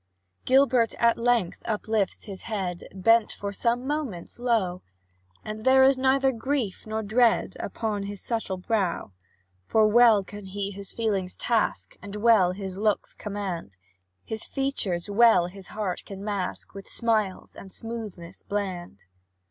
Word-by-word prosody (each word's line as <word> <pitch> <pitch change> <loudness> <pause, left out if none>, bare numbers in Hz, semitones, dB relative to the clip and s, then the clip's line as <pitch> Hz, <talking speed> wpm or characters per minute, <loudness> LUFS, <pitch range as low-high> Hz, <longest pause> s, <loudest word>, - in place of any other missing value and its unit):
Gilbert, 255 -3 +4
at 235 0 +3
length, 235 -6 +1
uplifts 215 -2 -1
his 195 -3 -8
head, 185 -5 -3
Bent 225 +4 +3
for 200 0 -5
some 240 +4 0
moments 265 - -4
low, 220 -7 0 0.6
And 215 0 -6
there 265 +1 +6
is 270 +1 +6
neither 265 +1 +3
grief 235 -4 -2
nor 220 0 -2
dread 225 -2 +2
Upon 210 0 -3
his 205 -1 -6
subtle 225 -4 -2
brow. 185 - -1 0.6
For 220 -1 +4
well 225 -2 +6
can 205 +1 -10
he 200 +1 -3
his 200 0 -8
feelings 200 -5 -1
task, 230 -2 -1
And 200 0 -8
well 210 -4 +4
his 190 -1 -6
looks 210 -1 0
command; 190 - -5 0.5
His 220 0 -4
features 215 -11 -1
well 215 -3 +5
his 185 +1 -10
heart 200 -4 -3
can 195 -1 -9
mask, 200 -3 -4
With 195 0 -10
smiles 215 -5 -1
and 190 - -11
smoothness 210 -7 -7
bland. 185 - -4
210 Hz, 140 wpm, -26 LUFS, 190-235 Hz, 0.6 s, there